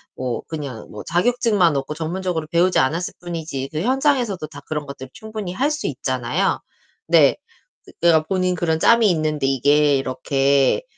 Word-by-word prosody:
뭐 125 -2 -3
그냥 140 -8 -6
뭐 105 - -8
자격증만 185 - +2
없고 135 +2 -3
전문적으로 165 0 -3
배우지 175 +3 +3
않았을 160 +7 0
뿐이지 160 -6 -5
그 155 - -3
현장에서도 250 - +1
다 - - -11
그런 150 -1 -4
것들 135 -1 -8
충분히 215 -4 -6
할 270 +9 +1
수 305 0 -4
있잖아요. - - -1 0.5
네. - - +5 0.7
내가 165 -2 +4
본인 185 +2 0
그런 160 -2 0
짬이 230 +3 +5
있는데 155 -3 -1
이게 145 +2 +3
이렇게 135 - +1
160 Hz, 335 characters per minute, -21 LUFS, 140-185 Hz, 0.7 s, 네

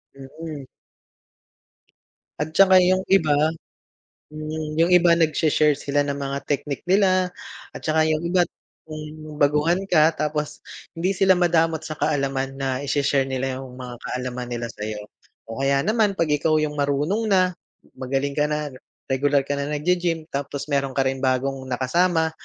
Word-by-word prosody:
Mm. 140 +1 -9 1.7
At 155 +1 -3
saka 190 +1 +6
yung 185 +1 +4
iba, 160 -6 +4 1.4
yung 170 +2 +3
iba 175 -1 +5
nagseshare 155 -2 +3
sila 145 0 -1
ng 140 - -1
mga 140 0 -4
technique 145 0 -3
nila, 185 -1 +2 0.4
at - - -8
saka 155 0 +2
yung 155 0 +1
iba 175 +1 +2 0.4
kung 155 0 -8
baguhan 150 +5 +3
ka, 160 -1 +5
tapos 150 -1 -3 0.3
hindi 175 +3 0
sila 190 0 +5
madamot 165 -2 +2
sa 155 -1 -6
kaalaman 135 -2 -1
na 135 -1 -2
i-she-share 140 -1 +1
nila 130 0 -2
yung 130 -2 -10
mga 125 -1 -8
kaalaman 125 0 -5
nila 120 -1 -4
sa'yo. 105 0 -6 0.5
O 115 - -6
kaya 135 0 +2
naman 215 -2 +2
pag 165 -4 0
ikaw 150 +2 +2
yung 150 -1 -2
marunong 145 +10 0
na, 185 -3 +3 0.5
magaling 135 +2 -1
ka 150 - +3
na, 150 -1 -3 0.4
regular 140 +1 +2
ka 140 +1 -3
na 140 - -2
naggi-gym, 170 +1 0
tapos 140 +1 -4
meron 140 -1 0
ka 135 - +2
ring 135 0 -1
bagong 130 +1 0
nakasama, 160 +6 +1
150 Hz, 145 wpm, -23 LUFS, 135-165 Hz, 1.7 s, saka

